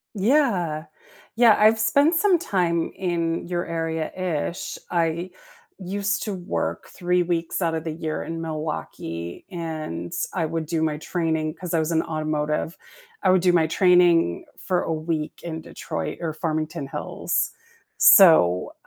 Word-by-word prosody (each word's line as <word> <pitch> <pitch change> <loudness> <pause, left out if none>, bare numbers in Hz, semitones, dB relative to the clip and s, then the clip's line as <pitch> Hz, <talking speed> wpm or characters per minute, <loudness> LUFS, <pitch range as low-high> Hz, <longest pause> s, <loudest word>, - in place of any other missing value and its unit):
Yeah. 195 - +1 0.5
Yeah, 230 -2 +6
I've 220 +1 +5
spent 285 +8 +3
some 370 +1 +4
time 175 - 0
in 170 -2 -2
your 175 -1 -2
area-ish. 165 +1 -3
I 170 +1 0 0.5
used 200 +2 -2
to 210 - -3
work 180 0 -3
3 180 -1 0
weeks 170 0 -2
out 165 -1 +1
of 160 - -2
the 160 - -3
year 155 -1 -4
in 165 0 -5
Milwaukee 150 - -5
and 155 - -5 0.2
I 170 -4 0
would 160 -1 -3
do 160 -1 -1
my 155 -1 0
training- 160 -2 -1
'cause 180 -2 -5
I 165 - +3
was 160 +1 -1
in 160 0 +2
automotive- 155 0 -2 0.5
I - - +5
would 185 -2 +4
do 180 - +4
my 165 -2 +4
training 175 - +4
for 180 -2 -1
a 165 - -2
week 155 -1 -3
in 160 -1 -5
Detroit - - -5
or 165 -2 -2
Farmington 155 -2 -3
Hills. - - -2 0.5
So 90 - +6
165 Hz, 145 wpm, -24 LUFS, 155-180 Hz, 0.5 s, Yeah